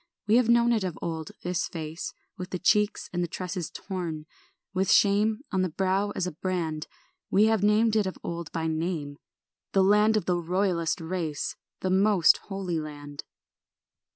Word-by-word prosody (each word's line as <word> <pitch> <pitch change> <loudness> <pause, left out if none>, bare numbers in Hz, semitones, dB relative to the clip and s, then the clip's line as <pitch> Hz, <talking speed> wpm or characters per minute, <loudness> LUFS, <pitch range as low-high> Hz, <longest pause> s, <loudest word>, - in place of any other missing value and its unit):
We 215 +3 +4
have 245 -2 +3
known 235 0 +5
it 220 -4 +1
of 180 -4 -3
old, 160 -2 -4
this 180 +1 -1
face, 160 0 -5 0.2
With 180 0 -7
the 180 - -3
cheeks 210 +3 +2
and 175 0 0
the - - -1
tresses 180 -1 -4
torn, 170 -5 -5 0.5
With 190 0 +1
shame 210 +3 +4
on 190 - +1
the 185 - +1
brow 190 +4 0
as 180 - -1
a 180 - -3
brand. 160 -2 -3 0.4
We 200 - +4
have 220 -2 +2
named 215 +2 +3
it 210 -3 +2
of 190 - -5
old 170 -2 -5
by 165 -1 -2
name, 160 -3 -2 0.5
The 195 - +4
land 210 +2 +4
of 215 - -1
the 175 -1 +1
royallest 170 -2 0
race, 165 -5 -3 0.3
The 185 - 0
most 190 -2 +5
holy 190 -4 -2
land. 145 -1 -8
185 Hz, 175 wpm, -27 LUFS, 165-200 Hz, 0.5 s, known